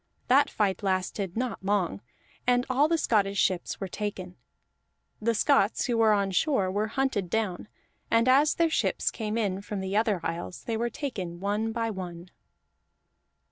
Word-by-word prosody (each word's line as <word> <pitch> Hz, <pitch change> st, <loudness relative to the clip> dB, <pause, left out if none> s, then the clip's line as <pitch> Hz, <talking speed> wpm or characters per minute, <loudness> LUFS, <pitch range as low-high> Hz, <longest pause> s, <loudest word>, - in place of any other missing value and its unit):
That 280 Hz, +3 st, +5 dB
fight 200 Hz, -2 st, 0 dB
lasted 190 Hz, 0 st, -2 dB
not 245 Hz, -4 st, -3 dB
long, 190 Hz, -, 0 dB, 0.5 s
and 245 Hz, 0 st, +3 dB
all 280 Hz, +4 st, +4 dB
the 330 Hz, +1 st, +2 dB
Scottish 200 Hz, -8 st, +1 dB
ships 185 Hz, -2 st, 0 dB
were 195 Hz, -, -3 dB
taken; 185 Hz, -2 st, -5 dB, 0.9 s
the 230 Hz, +1 st, +1 dB
Scots 280 Hz, +6 st, +3 dB
who 245 Hz, -, 0 dB
were 225 Hz, -1 st, +4 dB
on 200 Hz, -2 st, +2 dB
shore 195 Hz, -, +1 dB
were 205 Hz, +3 st, 0 dB
hunted 225 Hz, -6 st, -1 dB
down, 210 Hz, -2 st, -2 dB, 0.4 s
and 230 Hz, +1 st, +3 dB
as 280 Hz, +4 st, +5 dB
their 330 Hz, -1 st, +2 dB
ships -, -, +1 dB
came 220 Hz, -1 st, -3 dB
in 200 Hz, -4 st, -1 dB
from 205 Hz, 0 st, -5 dB
the 190 Hz, +1 st, -3 dB
other 215 Hz, -3 st, +2 dB
isles, 125 Hz, -, -4 dB
they 230 Hz, -, -2 dB
were 235 Hz, +2 st, -1 dB
taken 190 Hz, -, -5 dB
one 210 Hz, +3 st, -1 dB
by 230 Hz, 0 st, -1 dB
one. 180 Hz, -2 st, -7 dB
210 Hz, 165 wpm, -28 LUFS, 190-235 Hz, 0.9 s, That